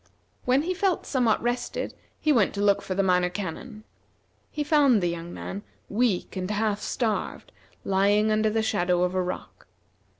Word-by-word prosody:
When 260 +3 +3
he 365 +3 -1
felt 375 -1 0
somewhat 245 -6 +1
rested 245 +1 -2 0.3
he 305 - +3
went 215 -6 +2
to - - -4
look 200 -1 +3
for 185 - -4
the 195 - +2
Minor 180 -1 +3
Canon. 205 +5 -6 0.7
He 300 - -3
found 290 -6 +4
the 175 -2 0
young 170 0 -5
man, 195 +3 -6 0.3
weak 215 -4 0
and 185 0 -3
half 210 0 0
starved, 225 -4 -2 0.3
lying 205 +2 +3
under 215 0 +2
the 220 +1 0
shadow 180 -4 +1
of 180 0 0
a 185 - +1
rock. 180 0 -6
210 Hz, 170 wpm, -26 LUFS, 185-245 Hz, 0.7 s, found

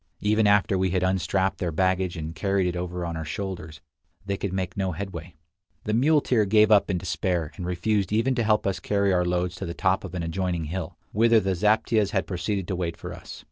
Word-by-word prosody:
Even 105 +1 +3
after 100 -2 +3
we 95 0 +2
had 90 0 0
unstrapped 95 +1 0
their 85 -2 -1
baggage 95 +1 0
and 80 0 -5
carried 95 +4 0
it 90 0 -1
over 90 0 -3
on 85 -1 -4
our 80 - -4
shoulders, 85 -2 -6 0.4
they 100 0 -1
could 100 -1 -3
make 95 -1 -3
no 95 -2 -1
headway. 90 -2 -7 0.5
The 110 - -2
muleteer 130 -2 +3
gave 105 +2 +4
up 105 -1 +5
in 95 - +1
despair, 85 -2 -2
and 90 -3 -5
refused 95 +2 0
even 115 +5 +2
to 120 -2 0
help 105 -1 +2
us 100 -1 -1
carry 100 -1 +1
our 90 -1 +2
loads 90 0 0
to 95 - -5
the 85 - -5
top 95 0 +1
of 95 -2 -7
an 85 - -2
adjoining 85 0 -2
hill, 90 +1 -5
whither 115 +2 +4
the 95 -2 0
zaptiehs 105 +3 +2
had 95 -5 +1
proceeded 95 +1 -3
to 95 - -1
wait 85 -2 -3
for - - -7
us. - - -10
95 Hz, 220 wpm, -25 LUFS, 90-100 Hz, 0.5 s, up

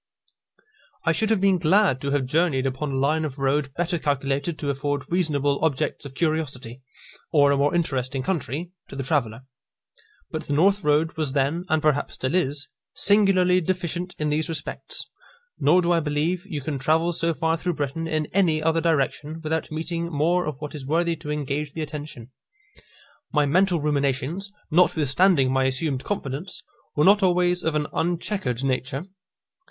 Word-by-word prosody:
I - - +4
should 220 -2 0
have 220 -3 +3
been 195 -1 +3
glad 175 -4 +3
to 140 - -2
have 140 -2 +1
journeyed 145 -1 +1
upon 135 +2 -2
a - - -2
line 150 +4 +1
of 145 -3 -4
road 135 +1 0
better 175 0 -1
calculated 140 +2 -1
to 145 -2 -1
afford 140 0 -2
reasonable 145 -5 +1
objects 150 -1 -1
of 135 -1 -9
curiosity, 140 -6 -2 0.5
or 145 -3 +5
a 140 - +2
more 145 +4 +2
interesting 135 -5 -1
country, 170 -1 -3 0.2
to - - -10
the 135 - -3
traveller. 125 -5 -1 0.9
But - - -5
the - - -1
north 195 +6 +3
road 150 +2 +2
was 150 -4 -1
then, 145 +5 0
and 160 -1 +1
perhaps 150 -2 +1
still 130 +4 -2
is, 145 -5 0 0.3
singularly 190 -3 +4
deficient 180 0 -3
in 150 0 -1
these 155 +2 0
respects; 165 - -4 0.5
nor 175 +5 +4
do 170 - +1
I 170 - +4
believe 160 +5 -1
you 155 -7 -4
can 140 0 -3
travel 160 +5 +2
so 165 0 0
far 160 +1 +1
through 175 +1 -2
Britain 150 +3 -3
in 155 -1 0
any 175 -5 +3
other 160 +1 +1
direction 155 0 0
without 160 +1 -2
meeting 165 +2 -3
more 170 +4 +1
of 145 -3 -4
what 150 -1 -6
is 150 -3 -7
worthy 165 +4 +1
to 150 - -8
engage 150 0 -2
the 160 - -3
attention. 145 -5 -8 1.0
My 150 -1 +3
mental 180 +4 +3
ruminations, 145 +6 -1 0.2
notwithstanding 155 -3 +3
my 130 0 +2
assumed 130 0 -1
confidence, 175 -2 -4 0.3
were 150 - +3
not 205 +2 +6
always 180 -1 +2
of 160 -1 0
an 150 -1 +1
unchequered 170 - -1
nature. 135 +3 -1
155 Hz, 170 wpm, -24 LUFS, 140-175 Hz, 1.0 s, not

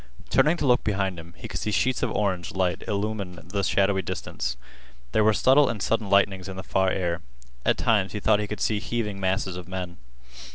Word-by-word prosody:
Turning 160 +3 +4
to - - -1
look 125 -2 +4
behind 95 -4 -1
him, 85 +1 -12
he - - -7
could - - -4
see - - -2
sheets 125 +4 +1
of - - +1
orange 95 -5 -1
light 90 -2 0
illumine 100 -3 -2
the 100 +1 -1
shadowy 95 0 +2
distance. 65 -7 -4 0.5
There 110 - +3
were 110 - +5
subtle 130 +7 +5
and 115 - -3
sudden 110 0 0
lightnings 100 -1 +2
in 95 - -7
the 95 - -5
far 95 0 +1
air. 85 -2 -1 0.4
At - - +2
times 100 -4 +2
he 105 - -2
thought 105 0 +3
he 105 - -2
could 105 - -5
see 105 -2 +1
heaving 105 -3 -3
masses 95 -1 0
of 90 -1 -7
men. 90 -2 -5
100 Hz, 210 wpm, -26 LUFS, 95-105 Hz, 0.5 s, were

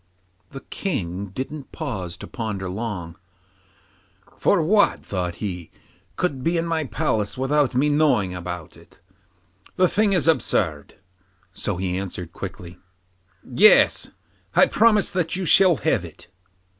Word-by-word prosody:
The 135 - -9
King 100 - -4
didn't 135 +7 -7
pause 95 - -5
to - - -9
ponder 105 -5 -4
long, 90 -4 -5 1.2
'for - - +2
what,' 205 +5 +3
thought 90 -3 -3
he, 90 -4 -5 0.5
'could 140 -8 -2
be 170 +1 +1
in 165 - 0
my 165 -2 -1
palace 105 -3 -1
without 135 0 +1
my 135 +4 +3
knowing 145 -11 +2
about 90 -2 -7
it - - -20 0.8
the 185 - +4
thing 210 +2 +2
is 170 -5 +1
absurd;' 80 - 0 0.6
so 95 +1 -3
he 90 0 -2
answered 90 -3 -6
quickly: 90 -2 -8 0.6
'Yes, 200 - +5 0.5
I - - +7
promise 215 -3 +3
that 180 -3 -1
you 190 0 -2
shall 185 0 +5
have - - 0
it. - - -12
120 Hz, 130 wpm, -23 LUFS, -, 1.2 s, I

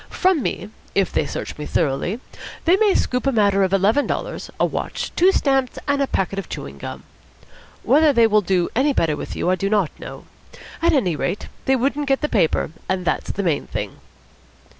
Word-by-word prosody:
From 370 -5 +2
me, 205 -3 -3 0.2
if 195 -1 +2
they 150 - 0
search - - -6
me 150 - -5
thoroughly, 165 - 0 0.5
they 340 +3 +6
may 410 0 +3
scoop 250 +1 0
a - - +4
matter 200 -4 +3
of 190 -1 +2
eleven 205 +9 +3
dollars, - - -4
a - - +4
watch, - - -3
two 365 +3 +5
stamps, 270 -7 +1
and 285 0 +1
a 275 - +1
packet 195 -2 -1
of 195 - -7
chewing 70 0 -7
gum. - - -7 0.8
Whether 295 +5 +5
they 235 -4 +5
would 210 -4 +2
do 180 -2 +2
any 275 +4 +3
better 160 - +1
with - - -6
you 180 - 0
I - - +3
do 195 +2 -2
not 200 -6 +2
know. - - -9 0.6
At 335 - +3
any 190 - +2
rate, 145 +7 -3 0.2
they 265 - +3
wouldn't 275 +3 0
get 270 -1 +2
that 300 - -2
paper; 165 -7 +1 0.2
and 185 -1 -1
that's - - -1
the 200 - -2
main 160 -6 0
thing." - - -5
215 Hz, 205 wpm, -21 LUFS, 185-280 Hz, 0.8 s, they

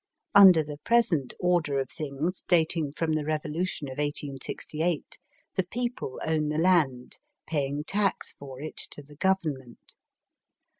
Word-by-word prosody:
Under 190 -6 +9
the 145 -1 -8
present 185 - +2
order 175 -6 +2
of 135 -1 -2
things, 155 +3 -3
dating 160 -3 +2
from 160 +1 -1
the 155 -1 0
revolution 155 +1 -2
of 130 +1 -7
1868, 150 +3 -3 0.4
the 190 - +3
people 240 - -4
own 155 -1 +1
the 150 - -1
land, 155 -8 +2 0.3
paying 145 -2 -1
tax 195 +3 0
for 135 -2 -10
it 155 +2 -7
to 145 - -5
the 145 +1 -16
Government. 155 -10 -2
155 Hz, 135 wpm, -27 LUFS, 145-180 Hz, 0.4 s, Under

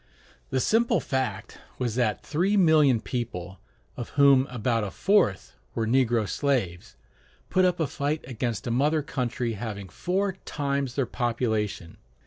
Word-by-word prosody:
The - - 0
simple 225 - +2
fact 120 -6 -3 0.2
was 120 -3 -1
that 115 -3 0
three 185 +7 +1
million 155 - +5
people, 95 -8 -5 0.4
of 120 - -6
whom 140 -2 +6
about 115 -2 -1
a 100 - -2
fourth 190 - +1 0.2
were 115 - 0
negro 120 -2 +2
slaves, 115 -13 -1 0.6
put 185 0 +4
up 180 -1 +1
a 160 - +2
fight 145 +2 -2
against 120 -3 -3
a 120 - -2
mother 150 +5 +2
country 125 -3 -2
having 100 -3 -6
four 190 - -1
times 140 -3 -2
their 135 - +1
population. 110 -7 -2
125 Hz, 140 wpm, -26 LUFS, 110-145 Hz, 0.6 s, whom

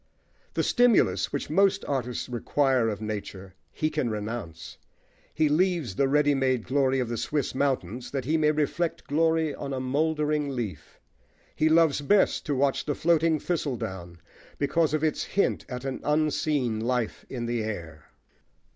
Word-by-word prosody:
The - - +1
stimulus 215 - +3
which - - -3
most 195 +3 +3
artists 125 -3 -2
require 130 0 +1
of 105 -1 -4
nature 100 -3 -6 0.2
he 155 0 -1
can 150 -6 -1
renounce. 105 -6 -6 0.5
He 155 -1 +2
leaves 165 - +1
the 135 +8 +1
ready 145 +1 +3
made 130 -4 +1
glory 135 0 +1
of 125 - -1
the 120 0 -3
Swiss 145 +4 -2
mountains 130 -4 -1
that 135 -3 -3
he 155 +4 +1
may 155 -1 +3
reflect 155 +3 -1
glory 160 0 +1
on 140 -1 -5
a 130 - -2
mouldering 150 +2 0
leaf. 115 -6 -6 0.6
He 155 - +2
loves 160 -3 +4
best 195 +5 +2
to 145 - 0
watch 135 +1 +1
the 145 - -1
floating 165 -1 +2
thistledown, 95 - -3 0.4
because 155 +2 +1
of 155 - -2
its 155 -2 0
hint 200 - 0
at 125 0 -6
an 135 -1 -3
unseen 150 -5 0
life 120 0 -2
in 120 -3 -4
the 120 -1 -1
air. 85 -8 -6
140 Hz, 155 wpm, -27 LUFS, 120-155 Hz, 0.6 s, loves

